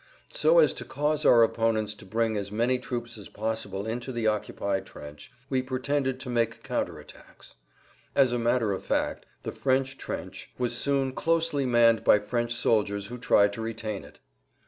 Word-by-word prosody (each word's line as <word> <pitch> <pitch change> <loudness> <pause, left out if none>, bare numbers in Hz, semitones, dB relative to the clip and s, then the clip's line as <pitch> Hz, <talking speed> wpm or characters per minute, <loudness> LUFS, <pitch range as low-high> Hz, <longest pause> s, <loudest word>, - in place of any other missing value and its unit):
So - - +4
as - - +6
to - - -7
cause 150 +1 -1
our 115 -1 +7
opponents 110 -2 +1
to 105 - -14
bring 115 +2 0
as 100 -1 -3
many 120 +4 +1
troops 120 -2 -5
as 100 - -11
possible 105 -2 -3
into 120 +4 -4
the 120 -3 -3
occupied 100 -2 -1
trench 75 0 -11 0.2
we 130 -2 0
pretended 130 +1 -1
to 130 - -6
make 115 -1 0
counter - - -2
attacks. - - -15 0.6
As 135 -3 +4
a 120 - 0
matter 120 -2 +1
of 95 - -5
fact - - -1 0.2
the - - -4
French 135 0 0
trench - - -6
was 125 -1 0
soon 135 -2 0
closely 165 -3 +1
manned 115 -2 +4
by - - +6
French 120 +3 -2
soldiers 105 -4 +1
who 125 +1 -7
tried 100 -3 +4
to 115 - -5
retain 110 -2 -4
it. - - -15
120 Hz, 175 wpm, -27 LUFS, 110-130 Hz, 0.6 s, our